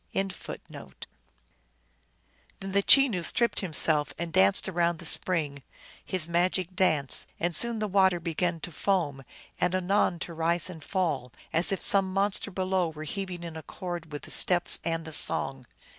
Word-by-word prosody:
THE 195 - +1
CHENOO 195 - -7
LEGENDS. - - -10
237 - - -11 1.5
Then 195 0 -7
the 200 +1 +2
Chenoo 245 -5 +6
stripped 235 +7 +2
himself, 155 -5 +1
and 170 -1 -5
danced 95 +1 +3
around 170 -2 0
the - - -12
spring 150 -6 -1 0.4
his 185 -4 0
magic 180 +1 0
dance; 155 -8 +1
and 175 0 -1
soon 235 +4 +2
the 215 0 -2
water 190 -2 +2
began 170 0 -2
to 175 - -6
foam, 150 -5 -1 0.4
and 180 +1 +1
anon 185 -1 +1
to 170 - -6
rise 170 +2 +1
and 160 -4 -11
fall, 150 - -2 0.2
as 165 +3 +4
if 195 - -2
some 195 -1 +2
monster 195 +1 0
below 185 -2 -1
were 155 -1 -9
heaving 180 +2 -5
in 165 -1 -8
accord 170 0 -7
with 145 - -7
the - - -11
steps 175 -1 +5
and 165 -1 -2
the 160 - -7
song. 135 -3 -1
175 Hz, 170 wpm, -27 LUFS, 160-190 Hz, 1.5 s, Chenoo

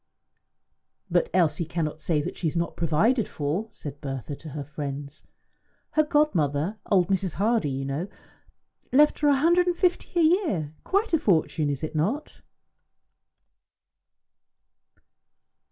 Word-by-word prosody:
"But 485 - +2
Elsie 170 -1 +2
cannot 160 -2 -3
say 150 -4 0
that - - -5
she 170 - -2
is 155 - -2
not 170 0 -1
provided 190 - +2
for," 155 +9 -2
said 145 -6 -9
Bertha 135 -1 -5
to 155 - -10
her 145 0 -5
friends. 145 0 -7 0.7
"Her 310 - +4
godmother 200 - +1
old 185 -4 +3
Mrs. 190 -3 0
Hardie, 215 -4 +1
you 135 0 -3
know 140 +7 -3 0.8
left 295 +3 +5
her 295 - +2
a 285 - +5
hundred 345 +6 +3
and 350 -1 +1
fifty 355 -1 0
a - - +5
year. 315 - +1
Quite 400 +1 0
a 325 - +4
fortune, 160 - +1
is 140 +1 -3
it 155 0 -4
not?" 215 - -2
170 Hz, 135 wpm, -26 LUFS, -, 0.8 s, left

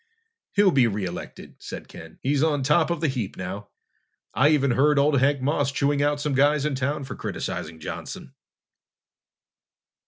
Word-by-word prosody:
"He'll 200 -1 +4
be 130 -5 +4
re 105 -3 -2
elected," 90 -1 -8
said - - -8
Ken. 80 -1 -12
"He's 140 +1 +1
on 150 -3 +1
top 150 +4 +3
of 170 -2 -2
the 160 - +2
heap 125 -8 -3
now. 95 +3 -6 0.7
I 145 +3 +4
even 140 -4 +3
heard 145 +4 +3
old 140 0 +3
Hank 135 0 +2
Moss 145 0 +1
chewing 140 +1 +1
out 145 0 +1
some 145 -1 -1
guys 145 +2 +3
in 150 - 0
town 140 +2 -2
for 130 -1 -6
criticizing 80 - -5
Johnson!" 80 - -7
140 Hz, 165 wpm, -25 LUFS, 130-150 Hz, 0.7 s, He'll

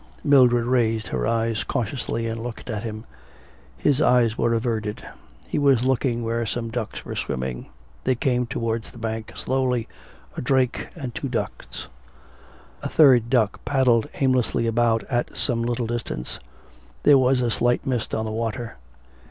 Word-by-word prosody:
Mildred 125 -4 +5
raised 115 -3 +1
her - - -1
eyes 115 -1 0
cautiously 115 0 -2
and 115 0 -3
looked 120 0 -6
at 105 -1 -3
him. 110 -1 -6 0.7
His 145 0 +2
eyes 120 -3 +4
were 115 0 +1
averted. 110 -2 -2 0.4
He - - -1
was 135 -4 +4
looking 125 -2 +1
where 115 +1 -1
some 115 +1 -3
ducks 115 -2 -4
were - - -5
swimming. 65 -1 -3 0.4
They 130 - +2
came 125 0 0
towards 115 0 -2
the - - -14
bank 110 -1 -4
slowly 130 -3 0 0.5
a - - -4
drake 130 -1 +1
and 135 -7 -6
two 135 - -4
ducks. 120 - -4 0.9
A - - -3
third 125 -7 +5
duck 115 -5 +1
paddled 125 -5 +2
aimlessly 130 -3 +1
about 115 0 +2
at 120 -2 -2
some 120 -4 +1
little 120 0 -1
distance. 110 - -4 0.6
There 145 -2 +7
was 130 0 +3
a 120 -2 +1
slight 120 +2 +1
mist 125 -4 -1
on 110 - -1
the 110 - -3
water. 115 - -3
120 Hz, 155 wpm, -24 LUFS, 115-125 Hz, 0.9 s, There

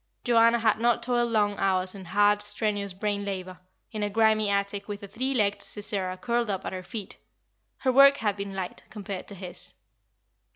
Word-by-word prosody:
Joanna 230 0 +4
had 220 -2 +2
not 235 0 +2
toiled 240 -1 +1
long 205 -2 +1
hours 185 -1 +1
in 195 -2 -10
hard, 205 +3 +3
strenuous 205 -1 0
brain 205 +2 -2
labour, 185 -2 -5 0.3
in 215 - -4
a 205 - 0
grimy 215 0 +3
attic, 200 0 -1
with 205 -1 -6
a - - -6
three 255 +7 -2
legged 205 -3 +1
Sisera 195 -3 -2
curled 235 +3 -1
up 195 -2 -3
at - - -4
her 185 - -5
feet; 205 0 -7 0.6
her 260 - +2
work 275 +2 +7
had 210 -5 -1
been 200 -1 -6
light, 185 -2 -5
compared 200 -3 -6
to 200 - -9
his. 180 -1 -9
205 Hz, 190 wpm, -27 LUFS, 195-225 Hz, 0.6 s, work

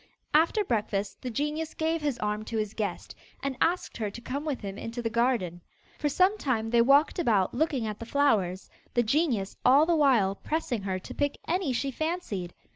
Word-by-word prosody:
After 330 +7 +4
breakfast 210 - -2
the 255 - -4
genius 300 +5 -2
gave 320 0 0
his 290 -4 -1
arm 210 0 -2
to 225 - -3
his 215 -1 -2
guest, 215 -2 -4 0.3
and 275 -1 -1
asked 355 +2 +1
her 215 -2 -2
to 200 - -9
come 275 +5 -4
with 290 -4 -2
him 195 -2 -5
into 230 +3 -6
the 230 -1 -2
garden. 230 -8 0 0.4
For 295 - +1
some 375 +7 +3
time 225 -5 -1
they 235 -1 +5
walked 280 +8 +4
about 215 - +2
looking 275 -3 0
at 215 -1 -4
the 230 - -7
flowers, 210 -10 +1 0.3
the 240 - +4
genius 235 - 0
all 275 +5 +6
the 340 0 +2
while 250 -11 +4
pressing 260 -1 -2
her 190 -1 -2
to 185 - -9
pick 285 -1 -1
any 350 -4 0
she 270 +3 -1
fancied. 265 - -3
250 Hz, 200 wpm, -28 LUFS, 215-300 Hz, 0.4 s, all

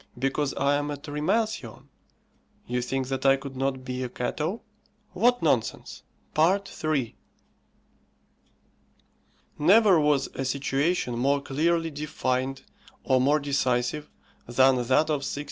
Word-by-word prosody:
Because 135 +2 -1
I 140 +1 +2
am 145 0 -3
a 145 - -4
Trimalcion, 150 - -2 0.8
you 125 +1 -2
think 130 +1 -2
that 135 -1 -3
I 135 0 +6
could 135 0 -8
not 130 0 -2
be 125 0 -4
a 125 - -3
Cato! 155 - -3 0.5
What 245 +3 +2
nonsense! 130 -8 -1 0.3
III. 155 - 0 2.4
Never 195 +3 +5
was 150 -2 +2
a 135 - -3
situation 135 0 -1
more 140 +3 +2
clearly 165 +4 0
defined 135 -3 -2 0.4
or 130 -1 +2
more 145 +4 +3
decisive 140 0 -1 0.4
than 130 +2 +4
that - - 0 0.3
of 150 - +1
1660. 140 - -4
140 Hz, 120 wpm, -26 LUFS, 130-155 Hz, 2.4 s, I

